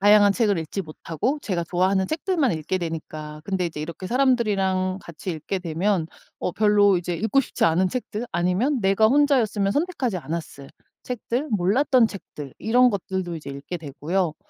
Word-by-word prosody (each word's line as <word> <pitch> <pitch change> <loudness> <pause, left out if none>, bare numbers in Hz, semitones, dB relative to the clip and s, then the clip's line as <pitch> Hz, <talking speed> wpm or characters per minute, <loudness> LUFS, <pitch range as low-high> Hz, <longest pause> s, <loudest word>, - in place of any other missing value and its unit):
다양한 205 0 +6
책을 205 -4 +2
읽지 160 +5 -4
못하고 165 - -3
제가 180 -6 -1
좋아하는 185 +3 +1
책들만 315 - 0
읽게 160 +4 -2
되니까 155 -3 -6
근데 190 -1 -1
이제 155 -3 -6
이렇게 170 +4 -6
사람들이랑 200 -7 +1
같이 170 +2 -6
읽게 160 +4 -3
되면 175 +1 0 0.3
어 180 - -2
별로 205 -2 +4
이제 175 0 -3
읽고 225 +9 +2
싶지 275 - -2
않은 170 +3 +3
책들 240 0 -4
아니면 185 - +1
내가 195 +2 +4
혼자였으면 240 -8 +3
선택하지 290 - -1
않았을 155 -4 -6 0.3
책들, 250 +4 -3
몰랐던 230 +6 +3
책들 150 -8 -9
이런 245 +3 +4
것들도 190 -3 -3
이제 145 -3 -8
읽게 140 +6 -6
되고요. 155 +3 -2
190 Hz, 375 characters per minute, -24 LUFS, 170-230 Hz, 0.3 s, 다양한